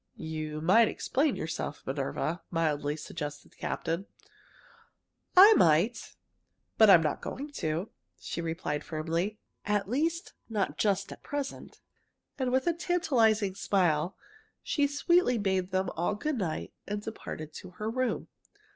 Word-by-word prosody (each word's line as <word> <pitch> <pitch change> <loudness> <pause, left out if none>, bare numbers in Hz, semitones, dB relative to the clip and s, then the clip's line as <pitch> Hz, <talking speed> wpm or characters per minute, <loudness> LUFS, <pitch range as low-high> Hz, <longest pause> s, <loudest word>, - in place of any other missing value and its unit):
"You 155 -1 -4
might 215 +8 +5
explain 275 +5 0
yourself, 160 -2 -4
Minerva," 140 +5 -2
mildly 150 -3 0
suggested 150 -2 -6
the - - -24
captain. 170 +5 -3 1.3
"I 405 +4 +11
might, 175 - +3 0.6
but 220 -2 +8
I'm 175 -4 +8
not 150 - -1
going 285 +3 -6
to!" 160 +6 -2 0.3
she 170 - -4
replied 160 -3 -3
firmly. 165 +6 -2 0.3
"At 205 -2 0
least, 325 - -1 0.2
not 210 -4 -1
just 200 -2 +1
at - - -10
present." 285 -1 -5 0.6
And 255 -1 0
with 260 +1 +2
a 345 - +3
tantalizing 250 - +2
smile, 180 -3 +1 0.5
she 290 -3 +1
sweetly 285 -2 +3
bade 190 -3 0
them 190 -1 0
all 175 +5 -1
good 295 +4 -2
night 165 -6 -3
and 205 0 -2
departed 155 -8 -7
to - - -9
her 215 - -3
room. 255 +2 -1
195 Hz, 135 wpm, -30 LUFS, 160-250 Hz, 1.3 s, I